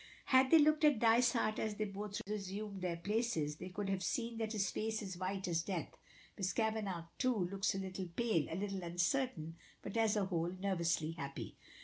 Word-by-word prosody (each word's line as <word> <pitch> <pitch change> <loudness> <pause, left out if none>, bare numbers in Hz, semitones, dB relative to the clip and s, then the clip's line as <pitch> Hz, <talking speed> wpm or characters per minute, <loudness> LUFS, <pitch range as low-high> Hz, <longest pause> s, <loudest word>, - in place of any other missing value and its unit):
Had 260 0 +5
they 325 - +8
looked 305 +1 +4
at 295 -4 +6
Dysart 230 -1 +3
as 215 -1 -1
they 215 - -1
both 205 0 -4
resumed 200 -1 -4
their 175 -2 -1
places, 195 -6 0
they 180 +3 -6
could 200 +2 -3
have 195 -1 0
seen 230 +5 -1
that 220 -1 -1
his 205 -2 0
face 220 0 -2
is 190 -2 -5
white 190 +2 -3
as 170 -1 +1
death. 175 -1 -4 0.4
Miss 190 -1 0
Kavanagh, 215 -6 -1
too, 240 -9 +2
looks 195 0 0
a - - -1
little 190 -1 -4
pale, 175 -2 +1
a - - -3
little 195 0 -2
uncertain, 175 - -1 0.3
but - - -6
as 225 -2 +3
a 205 -2 +2
whole 170 -2 0
nervously 170 -5 0
happy. 140 -4 -6
200 Hz, 195 wpm, -36 LUFS, 180-220 Hz, 0.4 s, they